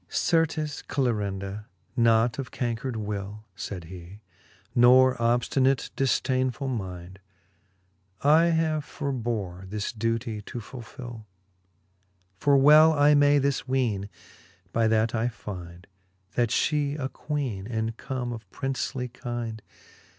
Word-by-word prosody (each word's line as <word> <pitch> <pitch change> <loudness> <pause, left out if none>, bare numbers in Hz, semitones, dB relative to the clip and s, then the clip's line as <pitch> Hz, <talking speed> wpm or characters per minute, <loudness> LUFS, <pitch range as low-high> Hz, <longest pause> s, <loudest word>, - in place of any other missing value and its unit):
XLI. - - -9
Certes, 155 -2 +1
Clarinda, 105 -5 -2 0.3
not 115 0 +3
of 135 - -4
cancred 120 +1 -3
will, 105 0 -5
Sayd 95 -3 -6
he, 90 +4 -11 0.5
nor 130 +1 +6
obftinate 125 +3 +1
difdainefull 130 -1 0
mind, 95 -2 -7 1.0
I 155 +4 +5
have 160 -2 +1
forbore 115 - -4
this 105 0 -3
duetie 115 0 -2
to 120 - -6
fulfill: 120 -1 -9 1.1
For 140 -1 +4
well 155 +3 +7
I 145 0 +5
may 145 0 +5
this 140 -1 0
weene, 115 -7 0 0.6
by 115 -1 +3
that 110 0 +2
I 115 +1 +1
find, 90 -6 -8 0.5
That 120 -2 +1
fhe 145 +3 +1
a 130 -3 -2
Queene, 135 -10 -4
and 110 -1 -2
come 125 -1 -4
of 110 -5 -9
princely 135 +1 -3
kynd. 120 -2 -5
120 Hz, 115 wpm, -27 LUFS, 105-135 Hz, 1.1 s, well